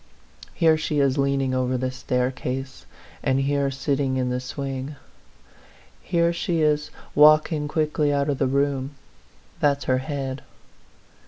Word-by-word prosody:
Here 160 -1 +4
she 150 -1 -1
is 140 0 +2
leaning 135 -1 +1
over 130 0 0
the 130 +1 -2
staircase, 130 +1 -3 0.3
and 135 -1 +1
here 140 0 +1
sitting 135 -1 -1
in 125 -1 0
the 125 - -1
swing. 135 +2 -5 1.1
Here 170 0 +1
she 170 -1 -1
is 150 0 +1 0.2
walking 155 0 +5
quickly 150 -1 0
out 140 0 +1
of 145 -3 -1
the 135 - +2
room. 140 0 0 0.6
That's 145 -1 +2
her 130 0 +1
head. 135 -1 -4
140 Hz, 135 wpm, -24 LUFS, 130-150 Hz, 1.1 s, walking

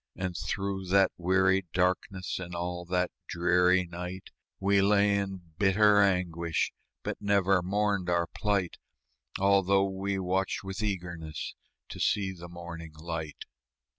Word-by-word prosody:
And 90 -1 -3
through 95 +2 -3
that 95 +1 +4
weary 95 +1 +2
darkness, 90 +1 0
And 90 -1 -6
all 90 0 -3
that 90 0 0 0.2
dreary 90 +1 +3
night, 90 +2 -7 0.3
We 100 0 +3
lay 100 0 +4
in 95 -2 -3 0.2
bitter 105 +1 +5
anguish, 85 -4 +1 0.3
But - - -4
never 100 -2 +3
mourned 100 0 0
our 85 -1 +2
plight, 100 0 -1 0.6
Although 100 0 +4
we 95 +1 -2
watched 95 +1 -1
with 95 +1 -5
eagerness 85 -7 -4 0.4
To - - -8
see 100 -2 +1
the 85 -1 -10
morning 85 -2 -8
light. 80 -1 -6
95 Hz, 130 wpm, -29 LUFS, 85-100 Hz, 0.6 s, bitter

